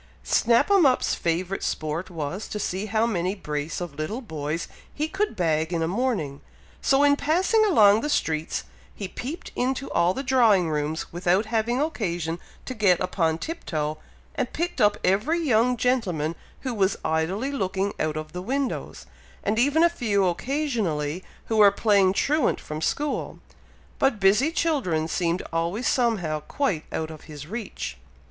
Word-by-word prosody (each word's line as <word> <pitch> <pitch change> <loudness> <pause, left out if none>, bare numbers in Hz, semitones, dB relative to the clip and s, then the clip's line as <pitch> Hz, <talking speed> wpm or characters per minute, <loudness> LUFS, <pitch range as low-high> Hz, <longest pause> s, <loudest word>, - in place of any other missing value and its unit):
Snap 235 - +3
'em 395 -3 +6
up's 260 -3 +3
favourite 175 +3 -1
sport 155 +4 -2
was, 170 +3 -4
to - - -5
see 195 0 -2
how 220 +2 +2
many 185 -4 -1
brace 150 -4 -4
of 175 -4 -5
little 155 - -3
boys 160 - -4 0.2
he 305 +1 -2
could 390 - -1
bag 160 -3 0
in 165 -2 0
a - - 0
morning; 190 - -1 0.4
so 270 +1 +3
in 285 0 +5
passing 365 +10 +2
along 215 - +6
the 295 - -2
streets, 160 - -1 0.3
he 200 - -5
peeped 275 - -6
into 265 +2 -1
all 175 +2 +2
the 270 - -3
drawing 225 - +4
rooms 150 +2 -2
without 180 +4 +2
having 230 +3 0
occasion 175 - -2 0.3
to 255 - -4
get 200 -7 +3
upon 165 -3 0
tiptoe, 155 - -3 0.3
and - - -3
picked 350 +2 -2
up 205 -1 +4
every 235 - +2
young 250 -5 +2
gentleman 185 -11 0 0.3
who 260 -2 -3
was 200 -2 +1
idly 175 - 0
looking 195 -5 -1
out 155 0 -1
of 155 0 -6
the 180 +2 -5
windows, 265 +5 -3 0.4
and 215 +2 +1
even 290 +6 +4
a - - +8
few 215 - 0
occasionally 185 - -1 0.2
who 220 - -1
were 205 -1 +8
playing 200 -2 +3
truant 285 +7 +1
from 155 0 -6
school, 290 - -2 0.6
but 270 -6 +2
busy 205 +10 +4
children 260 - 0
seemed 170 +1 -1
always 170 +9 -1
somehow 200 - +1
quite 180 - -2
out 160 0 -3
of 155 - -11
his 150 -2 -9
reach. 195 - -5
200 Hz, 160 wpm, -25 LUFS, 165-255 Hz, 0.6 s, a